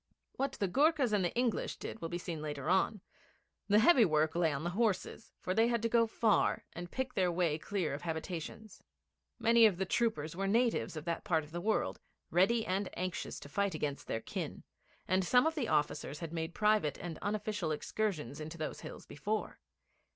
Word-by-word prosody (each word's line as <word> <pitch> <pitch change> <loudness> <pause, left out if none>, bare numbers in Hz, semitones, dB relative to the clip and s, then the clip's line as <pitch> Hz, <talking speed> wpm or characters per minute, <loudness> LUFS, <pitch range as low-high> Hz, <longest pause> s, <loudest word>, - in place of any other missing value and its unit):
What 275 +1 -1
the 200 - -1
Goorkhas 280 - +3
and 200 -2 +3
the 175 - +1
English 240 -2 0
did 225 - -7
will 165 - -3
be 175 - -2
seen 170 -3 -5
later 150 +1 -2
on. 190 +2 +2 0.7
The 205 0 +5
heavy 250 +2 +7
work 155 -3 +2
lay 170 -2 +2
with 140 - -4
the 175 - -1
horses, 215 +1 -1
for 185 - -1
they 225 +3 +4
had 235 -2 0
to 230 - +2
go 230 0 +4
far 220 -1 +2
and 175 +1 -6
pick 260 +3 -3
their 185 -2 +2
way 170 -3 +1
clear 165 -1 -2
of 140 - -5
habitations. 170 +5 -5 0.6
Many 230 -1 +6
of 195 -5 -1
the 190 - 0
troopers 175 -7 0
were 195 +2 -1
natives 230 -5 +1
of 155 - -6
that 170 -1 -2
part 165 -6 +1
of 150 - -14
the 175 +1 -4
world, 215 +4 0 0.3
ready 220 +6 +3
and 190 +1 -1
anxious 185 -1 -3
to - - -9
fight 200 +3 0
against 145 -2 -3
their 115 - -2
kin, - - -5 0.4
and 185 +1 +2
some 250 - +4
of 320 - +2
the 290 -8 -2
officers 150 -2 0
had 165 +1 -6
made 165 0 -3
private 210 -9 +2
and 170 -3 -6
unofficial 205 -4 -2
excursions 155 - -2
into 160 +2 -6
those 155 -1 -4
hills - - -9
before. 210 +9 -3
185 Hz, 200 wpm, -33 LUFS, 160-220 Hz, 0.7 s, heavy